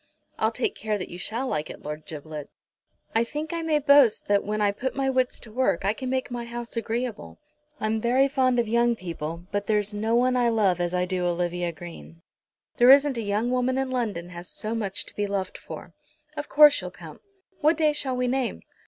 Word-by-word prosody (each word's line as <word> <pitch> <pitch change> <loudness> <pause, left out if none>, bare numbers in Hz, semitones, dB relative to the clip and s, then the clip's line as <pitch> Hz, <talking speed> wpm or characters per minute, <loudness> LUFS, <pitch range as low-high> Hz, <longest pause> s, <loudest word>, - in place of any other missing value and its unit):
"I'll 220 - +3
take 240 +2 -1
care 215 -1 -2
that 185 - -6
you 175 - -8
shall 235 +8 -3
like 155 -9 -2
it, - - -10
Lord 150 +1 -6
Giblet. 150 -1 -7 0.6
I 225 - +3
think 300 +6 -5
I 335 - -2
may 320 -2 +2
boast 280 -5 +5
that 205 -1 +3
when 210 +1 -2
I 205 -1 +3
put 255 +6 -4
my 270 -1 +1
wits 255 -1 +1
to 225 - -10
work 235 -6 +1
I 200 - +3
can 255 +3 -5
make 260 -1 -1
my 240 -1 -3
house 235 0 -6
agreeable. 230 - -3 0.4
I'm 215 0 0
very 255 +4 +3
fond 260 -2 +2
of 235 -2 +2
young 235 +1 +3
people, 170 -3 -6
but 205 0 -2
there's 210 -1 +1
no 220 +2 0
one 250 +1 +3
I 245 -1 +3
love 200 -6 +2
as 175 +1 -1
I 180 0 +1
do 180 -1 -2
Olivia 175 0 -1
Green. 165 0 -11 0.5
There 245 +1 +6
isn't 280 0 +7
a - - -1
young 215 +3 0
woman 255 +1 +1
in 265 -1 -1
London 210 -9 -2
has 175 0 -8
so 215 +1 -3
much 205 -4 -2
to - - -13
be 205 0 -1
loved 195 -2 -3
for. - - -9 0.4
Of 295 - -5
course 295 -1 +7
you'll - - -5
come. - - -12 0.4
What 310 +1 +3
day 310 -2 +3
shall 265 -4 -2
we 250 0 +1
name?" 255 -1 -1
225 Hz, 220 wpm, -26 LUFS, 185-255 Hz, 0.6 s, isn't